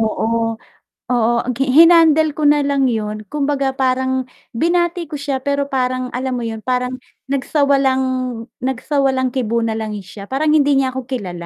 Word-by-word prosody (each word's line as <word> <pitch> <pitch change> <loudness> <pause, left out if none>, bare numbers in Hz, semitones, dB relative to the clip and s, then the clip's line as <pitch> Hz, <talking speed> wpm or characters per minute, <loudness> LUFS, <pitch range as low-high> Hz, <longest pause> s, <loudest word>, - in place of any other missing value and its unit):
Oo, 225 +1 0 0.5
oo. 245 - +2 0.3
Ang 250 - -1
gi 270 - +1
hinandle 325 -2 +6
ko 310 - -2
na 295 0 +4
lang 280 -1 +1
'yun, 215 -2 -2
kumbaga 280 -2 0
parang 260 0 +1 0.5
binati 345 +1 +1
ko 305 - -5
siya 280 -1 -2
pero 280 0 0
parang 255 -1 -1
alam 260 0 -2
mo 240 - -4
'yun, 225 -1 -5
parang 250 +1 -1 0.4
nagsawalang 275 -1 +1 0.7
nagsawalang-kibo 260 -3 0
na 225 - -1
lang 220 -1 -4
siya, 200 +2 -11
parang 300 +3 +1
hindi 290 -2 +4
niya 260 -1 +1
ako 260 0 -6
kilala. 180 -9 -5
260 Hz, 155 wpm, -18 LUFS, 240-285 Hz, 0.7 s, hinandle